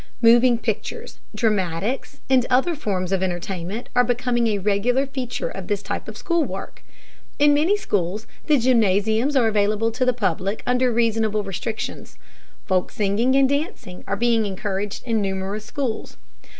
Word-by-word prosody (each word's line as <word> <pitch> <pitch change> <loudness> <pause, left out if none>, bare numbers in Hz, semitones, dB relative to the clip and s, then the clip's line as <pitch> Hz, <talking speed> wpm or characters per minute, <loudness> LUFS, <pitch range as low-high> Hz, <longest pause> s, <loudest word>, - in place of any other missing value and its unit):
Moving 240 +1 +6
pictures, - - -4 0.2
dramatics, 210 +1 -1
and 260 -2 +4
other 265 +7 +3
forms 195 - -2
of 190 -1 +1
entertainment 185 +3 -3
are 245 - +5
becoming 245 -1 +1
a 210 -2 +1
regular 210 +7 +1
feature 260 -3 -4
of 190 -2 -7
this 205 -1 -1
type - - -4
of - - -8
school 340 -3 +1
work. 195 -7 -7 0.5
In 290 0 +5
many 325 +8 +3
schools 205 - -2 0.2
the 300 - +5
gymnasiums 225 +1 +2
are 245 -4 +4
available 215 +1 +1
to 225 - -1
the 250 - +4
public 195 -3 -2
under 250 0 +2
reasonable 225 -2 +1
restrictions. 200 +3 -5 0.5
Folk 185 -2 +1
singing 215 +6 +1
and 275 -1 +5
dancing 285 - -3
are 200 - 0
being 230 -1 +2
encouraged 200 +1 -3
in 225 -3 +1
numerous 195 +2 -3
schools. 250 -2 -4
225 Hz, 150 wpm, -22 LUFS, 200-250 Hz, 0.5 s, Moving